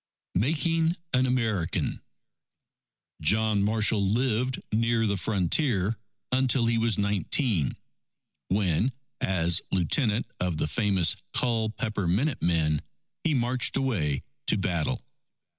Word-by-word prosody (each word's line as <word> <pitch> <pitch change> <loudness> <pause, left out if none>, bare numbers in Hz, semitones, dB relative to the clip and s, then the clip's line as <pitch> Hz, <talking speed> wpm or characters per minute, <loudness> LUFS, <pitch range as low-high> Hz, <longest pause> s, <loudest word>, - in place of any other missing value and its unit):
Making 160 - +2 0.2
an 130 0 +3
American 110 -9 -1 1.2
John 105 +5 +2
Marshall 110 0 +2
lived 125 +4 0
near 115 +1 +2
the 100 -2 +1
frontier, 100 - +1 0.4
until 130 -1 +2
he 115 0 +2
was 115 -3 +1
nineteen, 100 - +1 0.7
when 100 - +1 0.3
as 85 -1 +2
Lieutenant 105 - +1
of 90 -3 -1
the - - 0
famous 95 -2 +2 0.2
Culpeper 110 -4 0
Minute 120 - 0
Men, 80 -3 +1 0.4
he 155 -3 +1
marched 125 +1 +1
away 95 - 0 0.2
to - - +4
battle. 85 -5 -1
110 Hz, 105 wpm, -27 LUFS, 90-125 Hz, 1.2 s, to